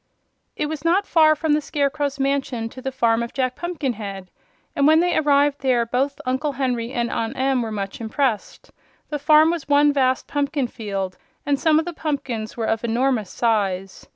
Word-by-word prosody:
It - - -1
was 300 -1 -5
not 360 +5 +2
far 310 -3 +5
from 305 0 0
the 300 - +2
Scarecrow's 285 -1 -1
mansion 270 -4 -1
to 255 - -11
the 265 - -3
farm 235 -3 +2
of 235 - -5
Jack 255 -2 0
Pumpkinhead, 225 - -4 0.4
and 280 0 +3
when 315 +1 +6
they 355 +1 +1
arrived 285 -1 +2
there 250 -3 +2
both 270 +5 -1
Uncle 260 +3 -1
Henry 250 -3 -2
and 235 -2 -1
Aunt 225 0 -3
Em 265 -1 +1
were 225 -2 -4
much 200 +1 -5
impressed. 225 -1 -2 0.4
The 295 - -3
farm 305 +2 +5
was 335 -4 -5
one 290 0 +5
vast 260 -2 +1
pumpkin 285 -1 -1
field, 195 -6 -5 0.3
and 285 -1 +1
some 315 -2 +3
of 320 - +1
the 350 - -5
pumpkins 270 -9 -4
were 225 - -1
of 225 +1 -1
enormous 235 -3 0
size. 195 -5 -1
270 Hz, 185 wpm, -22 LUFS, 230-295 Hz, 0.4 s, when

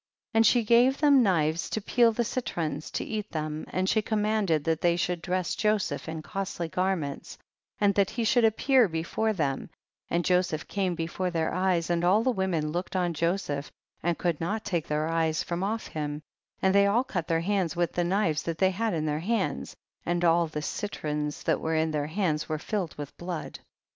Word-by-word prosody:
29. 225 - +2
And 225 - +5
she 240 +1 +4
gave 240 +5 +4
them 285 -3 +5
knives 165 -6 +1
to - - -1
peel 230 +2 +3
the 235 +2 0
citrons 170 - -3
to - - -3
eat 215 -1 -4
them, 155 -1 -4
and 185 +1 -1
she 220 - +3
commanded 210 -7 +1
that 160 0 0
they 170 -1 +3
should 175 -1 -1
dress 185 0 -1
Joseph 210 -9 0
in 160 -1 -5
costly 195 -3 -4
garments, 175 -5 -2 0.4
and 205 -1 +4
that 200 -1 +2
he 235 - -2
should 235 +2 +3
appear 235 +2 +4
before 170 +6 -1
them, 145 -9 -2 0.4
and 170 0 0
Joseph 180 -4 +1
came 190 -3 -1
before 170 +2 -2
their 165 -2 -1
eyes 180 -2 +1
and 170 0 +1
all 195 +5 +4
the 255 - +2
women 180 -8 -1
looked 175 +3 -4
on 175 -2 +1
Joseph, 160 -3 -1 0.3
and 170 0 0
could 170 -3 -1
not 210 +6 -2
take 170 -4 -1
their 150 +1 0
eyes 160 -1 +1
from 170 0 -3
off 220 +3 -2
him, 150 -1 -4 0.4
and 190 0 +4
they 200 0 +5
all 230 +5 +3
cut 180 -10 -3
their 165 0 +1
hands 185 -2 0
with 175 -1 0
the 175 - +1
knives 175 -4 +1
that 165 -1 -3
they 190 +2 +3
had 220 +1 -1
in 155 -1 -1
their 150 0 -1
hands, 205 +3 -1 0.3
and 175 0 0
all 170 0 +4
the 150 -1 -5
citrons 150 -7 -3
that - - +1
were 160 0 -1
in 160 0 +1
their 150 -1 -1
hands 160 -3 -1
were 155 - 0
filled 180 +1 -3
with 145 -1 -7
blood. 175 -2 -5
175 Hz, 205 wpm, -28 LUFS, 160-205 Hz, 0.4 s, And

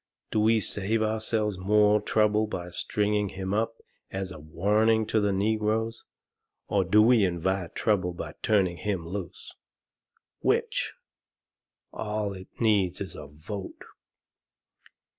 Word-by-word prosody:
Do 110 - +1
we 110 +1 +4
save 105 +2 0
ourselves 110 -2 0
more 105 +2 +4
trouble 105 0 +2
by 90 -4 -5
stringing 105 +2 0
him 95 +1 -4
up 115 +2 0 0.3
as 95 0 -4
a 90 - -9
warning 105 +8 +2
to 110 - +1
the 105 -1 +1
negroes? 110 +3 0 0.6
Or 100 -2 +2
do 105 +4 +5
we 115 -2 +5
invite 90 0 -1
trouble 100 -5 +1
by 85 - -7
turning 95 -5 +2
him 95 -5 -3
loose? 90 -2 -6 0.9
Which? - - 0 1.0
All 105 -2 -2
it 95 -1 -10
needs 100 -6 +2
is 100 - -6
a 75 -2 -8
vote." 95 +7 -8
105 Hz, 125 wpm, -27 LUFS, 95-110 Hz, 1.0 s, do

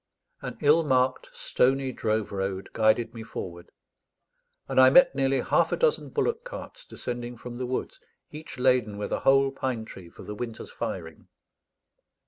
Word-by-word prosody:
An - - -6
ill 150 +3 +5
marked 130 -3 +1
stony 135 +1 +1
drove 110 -3 -1
road 95 -1 -3
guided 110 +1 +2
me 115 - -8
forward; 85 -6 -7 1.0
and - - +1
I 130 - +8
met 265 - +6
nearly 135 -1 +1
half - - +2
a - - 0
dozen 480 -1 +1
bullock 470 0 -1
carts - - -9
descending 120 - -6
from 120 +1 -8
the 125 - -2
woods, 130 - -4 0.3
each 155 -2 -9
laden 125 -5 +2
with 105 - -4
a - - 0
whole 135 0 +4
pine 130 -4 -3
tree 90 -5 -11
for - - -13
the 105 - -6
winter's 115 +1 -6
firing. 80 -1 -6
125 Hz, 160 wpm, -27 LUFS, 110-135 Hz, 1.0 s, I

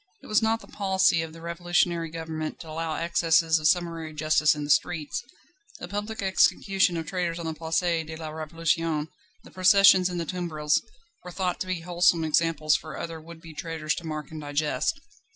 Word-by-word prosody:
It - - -13
was 215 +1 +2
not 225 0 +1
the - - -14
policy 190 -4 +2
of 165 -1 -6
the 165 +1 -12
revolutionary 170 0 0
government 160 -1 -5
to 160 - -10
allow 160 0 -3
excesses 165 -1 +2
of 155 - +2
summary 165 -2 0
justice 155 0 +3
in 150 - -4
the 145 - -1
streets: 160 +1 0 0.5
the - - -7
public 205 +2 -4
execution 190 -1 +2
of 165 - -3
traitors 175 0 -2
on 170 - -6
the 160 - -2
Place 160 +1 -1
de 165 -2 -1
la 160 -1 -6
Révolution, 160 0 -1 0.3
the - - -15
processions 190 -1 +6
in 180 - -4
the 170 - -2
tumbrils, 155 -4 0 0.4
were 180 - -8
thought 180 0 -2
to 185 - -3
be 185 -2 -2
wholesome 175 -1 +2
examples 155 -1 +2
for 155 - -5
other 165 -1 -6
would 165 +1 -12
be 165 -2 -11
traitors 160 -1 -3
to - - -6
mark 155 -1 -5
and 155 -1 -7
digest. 145 - -1
165 Hz, 190 wpm, -26 LUFS, 155-175 Hz, 0.5 s, processions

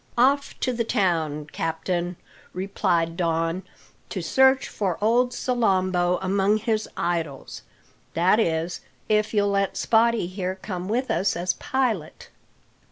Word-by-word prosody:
"Off 275 +4 +2
to 255 - 0
the 230 -1 0
town, 165 - 0
captain," 175 +2 -2 0.4
replied 180 -3 0
Don, 165 0 0 0.5
"to - - -4
search 265 0 +3
for 190 -5 -2
old 240 +4 +3
Salambo 185 -8 +1
among 195 +2 +2
his 220 -1 -1
idols. 165 -5 -3 0.5
That 185 +6 +4
is, 165 -3 0 0.3
if 215 0 +2
you'll 205 -2 +2
let 195 -1 0
Spottie 230 -2 +3
here 185 0 -3
come 185 -1 -6
with 250 +4 0
us 185 +4 +1
as 180 +1 0
pilot." 230 -12 -2
190 Hz, 125 wpm, -24 LUFS, 175-225 Hz, 0.5 s, That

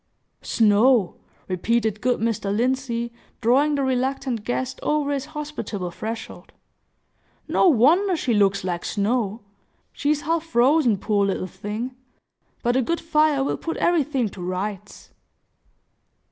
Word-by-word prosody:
"Snow!" 220 -1 +3 0.3
repeated 215 +3 0
good 250 0 +1
Mr. 225 -3 -1
Lindsey, 235 +1 -1 0.3
drawing 275 +6 +3
the 280 - 0
reluctant 260 -2 -1
guest 250 +3 -3
over 300 -1 0
his 280 -1 -2
hospitable 225 -12 -4
threshold. 225 +5 -7 0.9
"No - - +3
wonder 345 - +4
she 255 -6 0
looks 200 -2 +2
like 175 -2 -3
snow. 215 +1 -1 0.5
She 290 - -2
is 300 -1 +2
half 325 +1 0
frozen, 255 -4 +3
poor 200 0 +1
little 190 -1 -2
thing! 215 +7 -5 0.7
But 240 0 +1
a 260 - +3
good 335 +7 -1
fire 305 -3 +2
will - - -1
put 330 - -4
everything 295 -8 +1
to 190 - -11
rights!" 195 +2 -5
240 Hz, 130 wpm, -23 LUFS, 210-280 Hz, 0.9 s, wonder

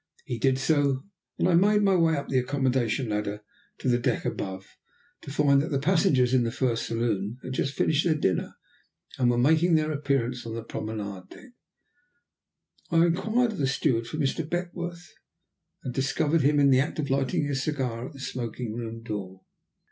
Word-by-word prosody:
He 125 -5 -4
did 130 +2 +2
so, 140 -2 +1 0.3
and - - +2
I 180 - +3
made 205 +4 +4
my 195 -1 +4
way 165 -2 +3
up 140 - -4
the 130 - +2
accommodation 130 -2 0
ladder 105 0 -3 0.3
to - - -5
the 120 -1 +3
deck 125 -1 -1
above, 95 -1 -4 0.6
to - - -9
find 140 -1 +3
that 155 - -3
the 140 - 0
passengers 135 -5 +3
in 130 - +4
the 115 - -1
first 120 -2 -1
saloon 115 -2 -1
had 130 - -5
just 135 +1 -1
finished 155 0 +2
their 165 -3 +3
dinner, 95 - -1 0.6
and 125 -2 +3
were 120 - +2
making 160 +7 +4
their 155 0 +1
appearance 135 -4 -1
on 115 -1 -6
the 115 - -5
promenade 105 -4 -6
deck. 260 - -14 1.4
I 165 0 +4
inquired 220 +8 +1
of 210 - -7
the 135 - +1
steward 120 -3 0
for 155 - -5
Mr. 150 +2 0
Beckworth, 175 0 -5 0.7
and 125 - -4
discovered 140 +4 +1
him 145 +1 +3
in 140 -1 +5
the 130 - +5
act 145 +4 -1
of 145 -3 -2
lighting 135 +1 +1
a 145 - -2
cigar 130 -4 -2
at - - -12
the 135 - -12
smoking 120 -3 -4
room 115 0 -6
door. 95 -4 -6
135 Hz, 185 wpm, -27 LUFS, 120-155 Hz, 1.4 s, in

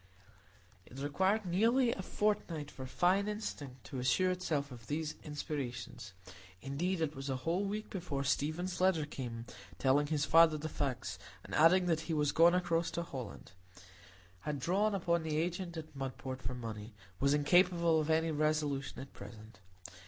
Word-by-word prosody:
It 130 - -12
required 190 +10 +1
nearly 230 +8 +3
a 195 - -3
fortnight 185 -7 -1
for 130 -1 -7
fine 185 +8 +2
instinct 145 - -5
to 130 - -6
assure 130 +9 +3
itself 155 -6 -1
of 120 -2 -11
these 155 +1 -2
inspirations; 135 -7 -5 0.5
indeed, 165 - -2
it 155 -1 -1
was 135 +1 -5
a 135 - 0
whole 180 +5 +1
week 210 +2 -4
before 165 -7 -3
Stephen's 170 +7 -1
letter 185 -5 +3
came, 120 -5 -6 0.3
telling 140 +2 +3
his 150 -1 +1
father 165 -1 +6
the 155 +1 -4
facts, 135 -5 -3 0.2
and - - -10
adding 180 +4 +6
that 165 -3 +2
he 160 - +1
was 150 -1 +2
gone 170 +3 +6
across 170 -2 +1
to 170 - -3
Holland,—had 95 - -9
drawn 200 +8 +1
upon 170 -2 +1
the 155 -1 -2
agent 175 +1 -2
at 155 -2 -8
Mudport 130 -1 -5
for 125 +2 -4
money,—was 110 +2 -3
incapable 170 +1 +4
of 155 0 -1
any 160 +1 +2
resolution 150 -3 0
at 135 - -10
present. 110 -1 -11
150 Hz, 155 wpm, -34 LUFS, 130-175 Hz, 0.5 s, father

